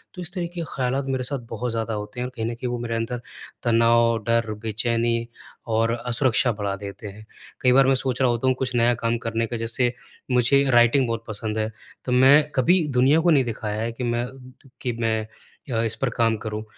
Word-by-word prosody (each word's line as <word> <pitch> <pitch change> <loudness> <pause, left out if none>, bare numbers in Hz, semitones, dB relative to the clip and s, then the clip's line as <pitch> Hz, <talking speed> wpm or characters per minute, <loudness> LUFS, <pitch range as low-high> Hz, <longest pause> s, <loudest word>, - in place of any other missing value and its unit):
तो 180 - -6
इस 175 - -6
तरीके 175 -1 -4
के 165 - -4
ख़्यालात 130 +1 -1
मेरे 130 -1 -1
साथ 140 +1 -1
बहुत 115 +1 -3
ज़्यादा 115 -1 -2
होते 105 +3 -6
हैं 125 - -1
और 130 - -10
कहीं 110 -1 -3
न 115 - -2
कहीं 125 +2 -5
वो 120 - -2
मेरे 115 -1 -3
अंदर 115 +2 -3 0.4
तनाव, 115 0 +4
डर, 115 -1 +1
बेचैनी 115 +1 0 0.4
और 115 +1 +1
असुरक्षा 125 -1 +2
बढ़ा 100 -2 -3
देते 100 +1 -8
हैं। 105 +2 -11 0.4
कई 125 - +4
बार 135 0 +5
मैं 135 - +4
सोच 130 0 -2
रहा 130 - +4
होता 120 +2 -1
हूँ 130 - +3
कुछ 125 -1 -2
नया 120 0 +4
काम 115 0 +1
करने 115 0 0
का 120 +1 -4
जैसे 120 +2 0 0.4
मुझे 125 +3 +4
राइटिंग 120 +2 +4
बहुत 115 0 -3
पसंद 110 0 -3
है। 110 +1 -1 0.3
तो 125 - -2
मैं 130 +4 +7
कभी 160 +5 +3
दुनिया 140 +5 +5
को 175 - +2
नहीं 140 -4 +4
दिखाया 110 -2 -3
है 115 - -2
कि 115 +2 -6
मैं 120 0 -1 0.5
कि 125 -2 -2
मैं 110 -1 +1 0.5
अ, 115 - +1
इस 115 -1 +2
पर 135 - +1
काम 115 -2 +2
करूँ। 110 0 -5
120 Hz, 220 wpm, -23 LUFS, 115-130 Hz, 0.5 s, मैं